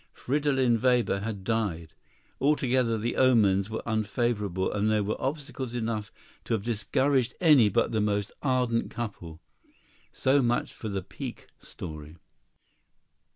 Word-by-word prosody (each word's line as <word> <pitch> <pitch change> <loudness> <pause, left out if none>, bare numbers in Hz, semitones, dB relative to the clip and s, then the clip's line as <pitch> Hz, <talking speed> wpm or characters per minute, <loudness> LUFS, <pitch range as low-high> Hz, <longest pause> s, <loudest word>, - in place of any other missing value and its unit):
Fridolin 135 -4 +1
Weber 125 -6 +2
had 100 -2 -5
died. 95 -8 -2 0.5
Altogether 130 -5 +2
the 115 +3 -2
omens 105 -6 +4
were 110 - -4
unfavorable, 110 -4 -1
and 105 +1 +1
there 105 -1 +2
were 105 +2 -3
obstacles 135 -3 -4
enough 110 -3 -3 0.3
to 115 - +1
have 105 - -4
discouraged 125 +3 +1
any 145 - +6
but 100 - +1
the 110 -2 +1
most 105 -1 0
ardent 125 -4 +1
couple. 90 -9 -6 0.7
So 135 +2 +2
much 120 -1 0
for 110 - -6
the 95 -2 -3
pique - - -8 0.2
story. 75 -1 -9
115 Hz, 130 wpm, -28 LUFS, 100-130 Hz, 0.7 s, any